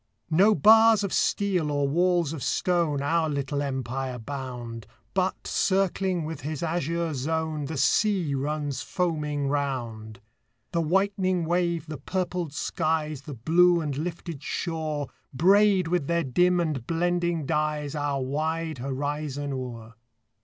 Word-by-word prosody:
No 200 Hz, +7 st, +5 dB
bars 220 Hz, +5 st, +6 dB
of 200 Hz, -, -2 dB
steel 185 Hz, -6 st, +1 dB
or 145 Hz, -1 st, +1 dB
walls 175 Hz, 0 st, +2 dB
of 155 Hz, -, -6 dB
stone 165 Hz, -5 st, +1 dB
Our 160 Hz, +2 st, +1 dB
little 140 Hz, 0 st, -2 dB
empire 130 Hz, -1 st, -3 dB
bound, 120 Hz, -3 st, -6 dB, 0.3 s
But, 185 Hz, 0 st, -1 dB
circling 190 Hz, -3 st, +1 dB
with 160 Hz, -2 st, -6 dB
his 150 Hz, +3 st, -4 dB
azure 170 Hz, 0 st, -1 dB
zone, 155 Hz, +2 st, -2 dB
The 155 Hz, +1 st, -4 dB
sea 180 Hz, -, +2 dB
runs 145 Hz, 0 st, -2 dB
foaming 150 Hz, -5 st, -1 dB
round; 120 Hz, -6 st, -3 dB, 0.5 s
The 170 Hz, -, +1 dB
whitening 185 Hz, +1 st, +1 dB
wave, 170 Hz, -1 st, 0 dB
the 155 Hz, -2 st, -7 dB
purpled 180 Hz, -4 st, -2 dB
skies, 155 Hz, -1 st, -1 dB
The 140 Hz, 0 st, -8 dB
blue 170 Hz, +8 st, +4 dB
and 150 Hz, -4 st, -2 dB
lifted 165 Hz, -1 st, -5 dB
shore, 155 Hz, -3 st, -3 dB, 0.3 s
Braid 195 Hz, +3 st, +4 dB
with 170 Hz, -4 st, 0 dB
their 170 Hz, 0 st, +1 dB
dim 180 Hz, +7 st, +3 dB
and 150 Hz, -8 st, -2 dB
blending 175 Hz, -1 st, 0 dB
dyes 150 Hz, -1 st, -1 dB
Our 145 Hz, -3 st, -1 dB
wide 155 Hz, +2 st, -2 dB
horizon 145 Hz, +2 st, -3 dB
o'er. 120 Hz, -3 st, -6 dB
155 Hz, 130 wpm, -26 LUFS, 140-175 Hz, 0.5 s, bars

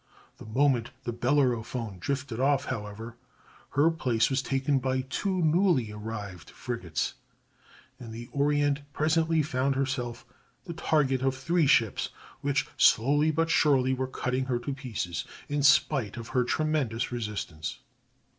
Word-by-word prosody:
The -, -, -10 dB
moment 125 Hz, 0 st, +2 dB
the 120 Hz, -, -3 dB
Bellerophon 120 Hz, -5 st, 0 dB
drifted 130 Hz, +3 st, -3 dB
off, 135 Hz, +1 st, +2 dB
however, 110 Hz, 0 st, -6 dB, 0.6 s
her 155 Hz, +3 st, +5 dB
place 125 Hz, -7 st, +1 dB
was 135 Hz, 0 st, +1 dB
taken 135 Hz, +1 st, 0 dB
by 130 Hz, 0 st, 0 dB
two 180 Hz, +8 st, -1 dB
newly 160 Hz, -, +3 dB
arrived 105 Hz, -4 st, -7 dB
frigates, 90 Hz, -, -3 dB, 0.9 s
and 115 Hz, -2 st, -9 dB
the 115 Hz, +1 st, -7 dB
Orient 145 Hz, +1 st, +1 dB
presently 160 Hz, +1 st, +2 dB
found 135 Hz, -1 st, 0 dB
herself 125 Hz, -3 st, -2 dB, 0.4 s
the 170 Hz, -, -5 dB
target 140 Hz, -5 st, +1 dB
of 135 Hz, 0 st, +1 dB
three 165 Hz, +3 st, +2 dB
ships 115 Hz, -7 st, +3 dB, 0.3 s
which 140 Hz, 0 st, 0 dB
slowly 145 Hz, +6 st, +4 dB
but 165 Hz, +1 st, +1 dB
surely 130 Hz, -5 st, +3 dB
were 130 Hz, 0 st, -1 dB
cutting 130 Hz, 0 st, -2 dB
her 125 Hz, -2 st, 0 dB
to 130 Hz, +4 st, -4 dB
pieces 105 Hz, -, -4 dB, 0.2 s
in 145 Hz, 0 st, -1 dB
spite 135 Hz, -5 st, +3 dB
of 115 Hz, -1 st, -7 dB
her 125 Hz, -, +2 dB
tremendous 135 Hz, -5 st, 0 dB
resistance. 105 Hz, -, -4 dB
130 Hz, 135 wpm, -28 LUFS, 115-145 Hz, 0.9 s, her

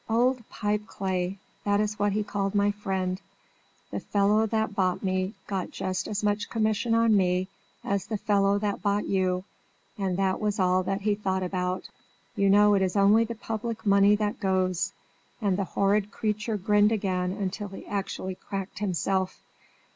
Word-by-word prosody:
'Old 245 Hz, +2 st, +2 dB
Pipeclay,' 195 Hz, -3 st, -2 dB, 0.3 s
that 205 Hz, 0 st, +2 dB
is 210 Hz, 0 st, -1 dB
what 205 Hz, -1 st, +2 dB
he 210 Hz, +1 st, 0 dB
called 200 Hz, -1 st, -2 dB
my 205 Hz, 0 st, +3 dB
friend, 190 Hz, -2 st, -2 dB, 0.7 s
'the -, -, -2 dB
fellow 210 Hz, +2 st, +2 dB
that 220 Hz, -1 st, 0 dB
bought 185 Hz, -2 st, 0 dB
me 185 Hz, +2 st, -1 dB
got 190 Hz, -3 st, -3 dB
just 190 Hz, 0 st, -3 dB
as 210 Hz, 0 st, -3 dB
much 205 Hz, 0 st, 0 dB
commission 225 Hz, +1 st, +1 dB
on 230 Hz, -1 st, +4 dB
me 185 Hz, -1 st, +2 dB, 0.4 s
as 200 Hz, -1 st, -1 dB
the 220 Hz, -, -2 dB
fellow 200 Hz, -1 st, +2 dB
that 205 Hz, -1 st, -2 dB
bought 205 Hz, 0 st, +1 dB
you, 185 Hz, -1 st, 0 dB, 0.6 s
and 190 Hz, -2 st, 0 dB
that 190 Hz, -1 st, +1 dB
was 210 Hz, -1 st, 0 dB
all 185 Hz, 0 st, +3 dB
that 195 Hz, +2 st, -2 dB
he 210 Hz, +1 st, +2 dB
thought 190 Hz, -2 st, -1 dB
about. 180 Hz, 0 st, -2 dB, 0.5 s
You 200 Hz, 0 st, +3 dB
know 205 Hz, +1 st, +6 dB
it 195 Hz, -, +3 dB
is 190 Hz, 0 st, 0 dB
only 205 Hz, +3 st, +5 dB
the 230 Hz, +1 st, -5 dB
public 225 Hz, 0 st, -4 dB
money 200 Hz, 0 st, +5 dB
that 210 Hz, 0 st, -2 dB
goes!' 185 Hz, -2 st, +1 dB, 0.5 s
And 200 Hz, -5 st, +1 dB
the 195 Hz, 0 st, -1 dB
horrid 200 Hz, +2 st, +1 dB
creature 215 Hz, 0 st, -2 dB
grinned 205 Hz, +2 st, +3 dB
again 190 Hz, -2 st, -1 dB
till 205 Hz, +1 st, -5 dB
he 195 Hz, -, -10 dB
actually 195 Hz, -1 st, -3 dB
cracked 195 Hz, +1 st, -6 dB
himself. 190 Hz, -1 st, -1 dB
200 Hz, 170 wpm, -27 LUFS, 190-210 Hz, 0.7 s, know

